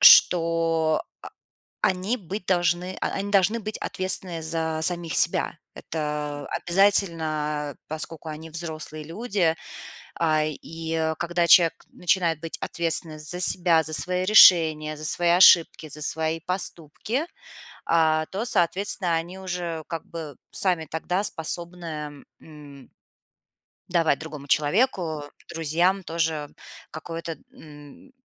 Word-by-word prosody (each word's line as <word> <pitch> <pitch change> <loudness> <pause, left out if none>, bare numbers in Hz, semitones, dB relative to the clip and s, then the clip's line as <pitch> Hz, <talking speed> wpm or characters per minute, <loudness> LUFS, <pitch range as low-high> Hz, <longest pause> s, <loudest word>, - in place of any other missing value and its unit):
что, 165 -2 +5 0.8
а, - - +4
они 190 +6 -2
быть 195 -2 -8
должны 180 0 0
а, - - -2
они 200 +1 -4
должны 200 +3 +2
быть 215 +1 -5
ответственные 185 -2 +2
за 160 0 -2
самих 170 -2 +5
себя. - - +2 0.2
Это 150 -2 -5
обязательно, 160 -6 0
поскольку 155 +1 -7
они 155 +1 -8
взрослые 155 -1 -4
люди. 180 -1 -1 0.7
А, 155 -2 +2
и 160 +1 -4
когда 170 0 -1
человек 170 -2 +6 0.2
начинает 170 -3 -1
быть 165 -1 -4
ответственный 165 -2 +1
за 155 +4 -4
себя, 175 -2 +5
за 160 0 -6
свои 180 +3 +1
решения, 160 -6 +5
за 155 - -7
свои 175 +3 +2
ошибки, 170 -2 +5
за 150 +1 -8
свои 160 +2 -2
поступки, 185 - -3 0.6
а, 160 -1 +2
то 205 +5 -4
соответственно 180 -3 0
они 170 +3 -5
уже 175 -4 -5
как 165 -2 -6
бы 155 -5 -9 0.2
сами 175 -4 +1
тогда 180 +5 -2
способны, 160 -4 -4 0.2
м 145 -3 -14 1.0
давать 165 -5 +1
другому 150 -3 -9
человеку, 160 - 0 0.3
друзьям 170 +4 0
тоже 160 -3 -2 0.4
какое-то, 165 0 -7
м, 150 - -15
165 Hz, 115 wpm, -24 LUFS, 155-180 Hz, 1.0 s, человек